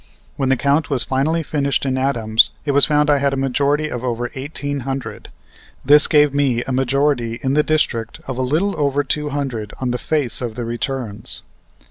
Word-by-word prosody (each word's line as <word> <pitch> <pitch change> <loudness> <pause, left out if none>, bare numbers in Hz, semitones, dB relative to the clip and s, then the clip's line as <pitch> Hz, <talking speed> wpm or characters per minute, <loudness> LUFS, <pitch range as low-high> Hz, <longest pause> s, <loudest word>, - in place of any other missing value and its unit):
When 135 -2 -1
the 135 - +3
count 140 +4 +1
was 135 -4 0
finally 155 +5 0
finished 140 -2 -1
in 130 -1 0
Adams 115 -4 +2 0.2
it 145 - +1
was 140 0 +8
found 150 0 +2
I 145 -1 +3
had 140 0 +1
a - - -2
majority 140 +3 0
of 125 -4 -5
over 120 -1 -3
eighteen 145 +1 -4
hundred. 135 0 -6 0.6
This 145 +2 +7
gave 150 -2 +4
me 135 -4 +1
a - - -5
majority 130 -2 0
in 135 0 0
the 150 - +4
district 125 -7 -1
of 130 - -4
a 130 - -2
little 160 +10 0
over 145 0 +1
two 150 +2 -2
hundred 130 -7 -4
on 130 -2 -1
the 125 - -2
face 150 -7 -1
of 120 -3 -4
the 120 -1 -4
returns. 120 -2 -4
135 Hz, 195 wpm, -19 LUFS, 125-145 Hz, 0.6 s, was